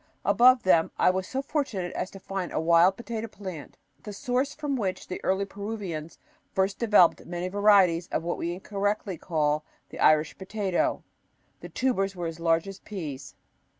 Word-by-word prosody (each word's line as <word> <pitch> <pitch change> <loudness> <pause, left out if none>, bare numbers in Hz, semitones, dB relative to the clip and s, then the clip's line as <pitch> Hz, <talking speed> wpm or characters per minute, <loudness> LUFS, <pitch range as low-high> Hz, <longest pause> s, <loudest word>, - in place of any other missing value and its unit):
Above 250 +1 +5
them 170 -3 +4
I - - +4
was 185 0 -3
so 270 +1 -3
fortunate 250 - -2
as 185 - -3
to 195 - -11
find 190 -1 -4
a - - -1
wild 170 +3 +4
potato 230 -1 -5
plant, 185 -8 -9 0.2
the 210 - -8
source 255 +6 -1
from 295 -2 -2
which 195 -7 -3
the 185 - -6
early 190 +1 +1
Peruvians 195 -6 -6 0.3
first 190 +1 0
developed 210 -7 +4
many 175 +1 -3
varieties 195 -4 +4
of 160 - -2
what 175 +1 -3
we 170 - -2
incorrectly 200 -1 -2
call 150 -2 0 0.3
the - - -10
Irish 155 0 +4
potato. 190 -1 -1 0.6
The - - -9
tubers 195 -7 0
were 175 -1 -4
as 165 0 -5
large 165 +2 +2
as 195 -1 -8
peas. 150 -10 -7
190 Hz, 170 wpm, -27 LUFS, 170-210 Hz, 0.6 s, Above